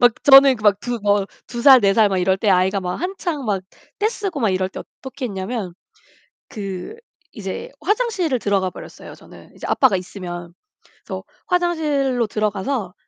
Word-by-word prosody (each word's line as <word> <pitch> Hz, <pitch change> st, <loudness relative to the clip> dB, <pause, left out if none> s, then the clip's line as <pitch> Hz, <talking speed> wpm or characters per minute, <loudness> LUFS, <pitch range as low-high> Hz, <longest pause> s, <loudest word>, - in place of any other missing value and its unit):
막 245 Hz, -1 st, +6 dB
저는 270 Hz, -2 st, +8 dB
막 205 Hz, -1 st, +3 dB
두 245 Hz, -1 st, -3 dB
뭐 205 Hz, -1 st, +2 dB, 0.2 s
2 240 Hz, 0 st, -6 dB
살, 265 Hz, -1 st, +8 dB
4 200 Hz, -2 st, +3 dB
살 215 Hz, -1 st, +5 dB
막 190 Hz, -1 st, 0 dB
이럴 190 Hz, +1 st, +2 dB
때 205 Hz, +2 st, -1 dB
아이가 190 Hz, +1 st, +2 dB
막 180 Hz, -1 st, -3 dB
한창 350 Hz, -5 st, -3 dB
막 200 Hz, -4 st, -1 dB, 0.4 s
떼쓰고 410 Hz, -6 st, -2 dB
막 220 Hz, -4 st, +2 dB
이럴 185 Hz, 0 st, 0 dB
때 -, -, -8 dB
어떻게 265 Hz, -1 st, -8 dB
했냐면 195 Hz, -2 st, -5 dB, 0.7 s
그 195 Hz, -, -6 dB, 0.4 s
이제 195 Hz, -4 st, -6 dB
화장실을 375 Hz, -, 0 dB
들어가버렸어요. 195 Hz, -4 st, -3 dB
저는. -, -, -16 dB
이제 -, -, -8 dB
아빠가 260 Hz, -8 st, +3 dB
있으면. 175 Hz, -2 st, -7 dB, 0.5 s
그래서 -, -, -6 dB, 0.2 s
화장실로 300 Hz, -9 st, 0 dB
들어가서 210 Hz, 0 st, -2 dB
215 Hz, 305 characters per minute, -20 LUFS, 190-275 Hz, 0.7 s, 저는